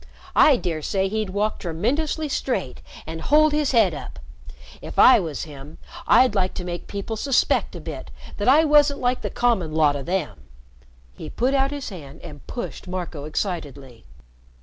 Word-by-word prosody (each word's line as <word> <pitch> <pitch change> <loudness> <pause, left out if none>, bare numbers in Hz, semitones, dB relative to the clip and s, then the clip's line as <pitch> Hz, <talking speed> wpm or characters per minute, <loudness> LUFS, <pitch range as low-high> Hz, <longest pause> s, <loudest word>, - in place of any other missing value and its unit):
I 285 -4 +6
dare 165 -7 -3
say 190 +4 0
he'd 215 -1 -2
walk 205 +3 -1
tremendously 270 - -1
straight 250 - -3 0.2
and 160 +1 -6
hold 305 - +4
his 300 -2 +1
head 235 -4 +4
up. - - -8 0.6
If - - -9
I 260 - +8
was 160 -8 -4
him, 145 0 -11 0.3
I'd 255 0 +5
like 185 -2 0
to 180 - -4
make 175 -1 -6
people 200 +2 -5
suspect 265 +4 +1
a - - -6
bit - - -8 0.3
that 205 - -2
I 290 +5 +6
wasn't 295 -1 +4
like 250 0 0
the - - -3
common 230 -10 0
lot 150 -2 +3
o' 140 - -4
them." 170 - -3 0.7
He - - -8
put 255 +3 0
out 270 0 +2
his 285 -1 -5
hand 155 -6 -11
and 150 -4 -11
pushed 240 - -6
Marco 175 -5 -5
excitedly. 145 - -5
195 Hz, 170 wpm, -23 LUFS, 160-260 Hz, 0.7 s, I